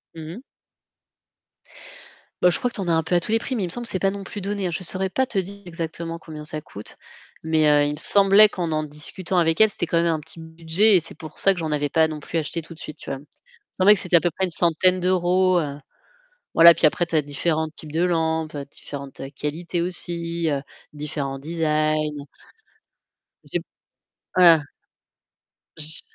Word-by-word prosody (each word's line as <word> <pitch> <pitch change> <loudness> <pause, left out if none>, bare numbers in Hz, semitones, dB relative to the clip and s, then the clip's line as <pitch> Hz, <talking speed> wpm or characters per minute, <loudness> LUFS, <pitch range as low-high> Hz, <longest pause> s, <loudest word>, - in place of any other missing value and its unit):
Mmh 160 +2 -8
mh. 235 - -10 2.0
Ben 180 - +6
je - - +2
crois 245 -1 -2
que - - -11
t'en 195 -3 -4
as 170 - +2
un 160 0 +2
peu 180 - -4
à 175 - +5
tous 175 - -6
les 225 - +4
prix, 255 +3 -4
mais 225 - -2
il 180 - -1
me - - -7
semble 240 +2 -5
que - - -1
c'est 185 - -2
pas 195 - +2
non 200 0 -6
plus 205 +2 -8
donné. 195 -2 -3
Je 180 - -4
saurais 185 +2 -2
pas 265 +4 0
te 230 - -4
dire 195 +2 -3
exactement 165 0 -5
combien 155 -2 -10
ça 155 0 -5
coûte, 105 -8 -11 0.5
mais, 160 -1 +2
heu, 145 -1 +4
il - - -1
me - - -8
semblait 200 +3 +6
qu'en 175 -5 -4
en 155 0 0
discutant 155 +5 -5
avec 165 +2 +2
elle, 220 - +7
c'était 175 - -2
quand 170 - -1
même 170 - +1
un 160 - -1
petit 160 +2 -12
budget 165 +6 +1
et 180 - +5
c'est 165 - -8
pour 155 -2 -11
ça 195 - +3
que 180 - -8
j'en 160 -2 -3
avais 145 -1 -1
pas 160 +2 +3
non 155 -1 -6
plus 165 +3 -3
acheté 160 +2 -4
tout 165 - -12
de 160 - -17
suite, 155 - -9
tu - - -8
vois? 135 - -3
Il - - -15
me 150 - -26 0.3
semblait 195 +3 +7
que 195 - +1
c'était 180 -1 +3
à - - +5
peu 175 - 0
près 190 - 0
une 185 - -2
centaine 180 +2 +2
d'euros, 185 0 +2
heu, 145 -2 -5 0.8
voilà, 170 +1 +9
puis 165 - +2
après 165 +3 +1
tu 170 - -8
as 155 - +4
différents 155 +2 -2
types 155 -1 -11
de 165 +2 0
lampes, 160 -3 -1 0.2
différentes 140 -1 -9 0.2
qualités 170 +4 -3
aussi, 170 -1 +2
heu, 140 -2 -2 0.3
différents 145 -2 -4
designs. 155 -1 -1 1.2
J'ai - - -3 0.8
ah 170 -4 +7 1.2
Je 155 +1 +6
165 Hz, 220 wpm, -23 LUFS, 155-185 Hz, 2.0 s, voilà